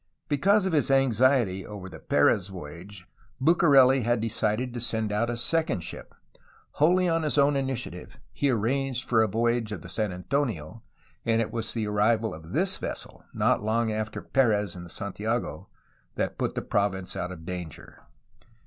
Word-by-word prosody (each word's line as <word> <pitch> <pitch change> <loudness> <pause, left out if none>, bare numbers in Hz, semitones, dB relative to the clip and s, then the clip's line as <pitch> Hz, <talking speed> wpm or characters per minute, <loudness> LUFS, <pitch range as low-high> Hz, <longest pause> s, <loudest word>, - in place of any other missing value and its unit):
Because 195 +8 +3
of 190 - -1
his 150 -3 +2
anxiety 130 -6 +3
over 100 -2 -8
the 95 - -10
Perez 95 -2 +2
voyage 90 +2 -10 0.3
Bucareli 135 -4 +5
had 120 +1 +1
decided 115 +2 -1
to 120 - -4
send 110 -2 -1
out 110 +3 0
a 120 - -2
second 155 - +1
ship. - - -8 0.7
Wholly 180 +4 +4
on 165 -1 +1
his 150 -1 -1
own 140 0 +4
initiative 130 -9 -4
he 140 - 0
arranged 130 +2 0
for 115 -2 +3
a 110 - +3
voyage 115 +1 0
of 95 -7 -6
the 90 - -9
San 105 +1 -1
Antonio, 90 - -3 0.4
and 115 0 +2
it 115 - -1
was 115 -1 -3
the 110 -2 -1
arrival 110 +2 +1
of 80 +1 -11
this 185 +6 +1
vessel, - - -7
not - - +1
long 110 +1 0
after 110 0 -4
Perez 105 -8 +1
in 90 - -8
the 85 - -11
Santiago, 100 -3 -3 0.5
that - - -2
put - - -1
the - - -2
province 95 -2 -1
out 90 - -3
of 80 -3 -10
danger. 90 -4 -7
115 Hz, 170 wpm, -27 LUFS, 100-135 Hz, 0.7 s, Bucareli